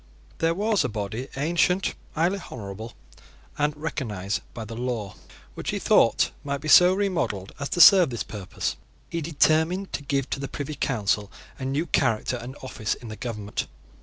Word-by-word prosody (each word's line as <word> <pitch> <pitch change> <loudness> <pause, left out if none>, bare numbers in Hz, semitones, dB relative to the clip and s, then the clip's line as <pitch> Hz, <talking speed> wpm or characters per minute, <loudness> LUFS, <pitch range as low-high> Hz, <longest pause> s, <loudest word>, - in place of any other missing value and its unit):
There 165 0 +2
was 210 0 +2
a 130 - -1
body 110 +4 -4
ancient, 175 +5 +2 0.2
highly 175 +5 +1
honourable, 110 0 -7 0.6
and 150 0 0
recognised 110 - -3
by 110 - -7
the 115 - -8
law, 115 -5 -3 0.4
which, - - -5
he - - -1
thought, - - +4
might 140 -1 -2
be 155 - -7
so 180 +5 +8
remodelled 175 - -1
as 140 - -3
to 175 - +2
serve 180 -3 +9
this 120 -3 -3
purpose. 100 -4 -4 0.3
He 165 - -2
determined 160 +4 +2
to - - -2
give 140 -2 -1
to - - -1
the 140 - -3
Privy 145 +2 -5
Council 105 -7 0 0.3
a 130 - -4
new 140 +5 0
character 125 -5 +1
and 125 +3 -8
office 110 -5 -2
in 120 - -10
the 110 - -6
government. 105 -3 -4
135 Hz, 170 wpm, -25 LUFS, 110-165 Hz, 0.6 s, serve